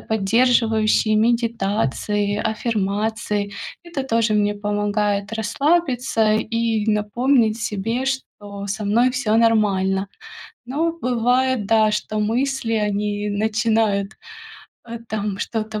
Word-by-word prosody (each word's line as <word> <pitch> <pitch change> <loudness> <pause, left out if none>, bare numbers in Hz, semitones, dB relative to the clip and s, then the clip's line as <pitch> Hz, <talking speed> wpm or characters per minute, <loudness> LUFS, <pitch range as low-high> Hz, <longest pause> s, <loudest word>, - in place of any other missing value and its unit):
поддерживающие 220 0 +2
медитации, 210 - 0
аффирмации. 210 -1 -2 0.3
Это 340 -5 -4
тоже 230 -3 +1
мне 205 0 +1
помогает 205 0 -1
расслабиться 245 -1 +1
и 225 0 0
напомнить 220 +2 +1
себе, 225 +4 -2
что 205 -7 -5
со 210 +2 -4
мной 235 +5 +3
всё 250 -4 -1
нормально. 200 -4 +2 0.6
Но 320 +6 -1
бывает, 250 -4 0
да, 220 -1 +4
что 215 0 -2
мысли, 240 +2 -1
они 210 -1 -1
начинают, 215 -1 0 0.7
э, 235 0 -6
там 205 -2 -3
что-то 220 -1 -3
220 Hz, 100 wpm, -21 LUFS, 205-235 Hz, 0.7 s, да